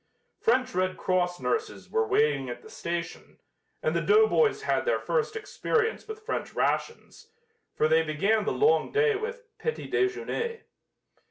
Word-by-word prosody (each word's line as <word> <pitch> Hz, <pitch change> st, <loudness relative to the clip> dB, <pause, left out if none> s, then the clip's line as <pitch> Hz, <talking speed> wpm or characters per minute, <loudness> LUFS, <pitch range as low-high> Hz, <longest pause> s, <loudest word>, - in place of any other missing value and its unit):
French 255 Hz, +2 st, +2 dB
Red 185 Hz, 0 st, 0 dB
Cross 180 Hz, -1 st, 0 dB
nurses 445 Hz, -, -2 dB
were 450 Hz, 0 st, +1 dB
waiting 435 Hz, +3 st, +2 dB
at -, -, -7 dB
the 435 Hz, -, -13 dB
station, 170 Hz, -, -5 dB, 0.5 s
and 485 Hz, -, +1 dB
the -, -, +1 dB
doughboys 435 Hz, +1 st, +4 dB
had -, -, +1 dB
their -, -, +1 dB
first 455 Hz, -2 st, -1 dB
experience 450 Hz, +1 st, -1 dB
with 435 Hz, 0 st, -8 dB
French -, -, -3 dB
rations, 450 Hz, 0 st, -2 dB, 0.4 s
for 155 Hz, -, +3 dB
they 160 Hz, +1 st, +4 dB
began 195 Hz, +8 st, +1 dB
the -, -, 0 dB
long 445 Hz, +2 st, +3 dB
day 440 Hz, 0 st, +3 dB
with 470 Hz, +4 st, -5 dB, 0.2 s
"petit 465 Hz, -, -4 dB
déjeuner." 455 Hz, +4 st, -1 dB
435 Hz, 150 wpm, -27 LUFS, -, 0.5 s, doughboys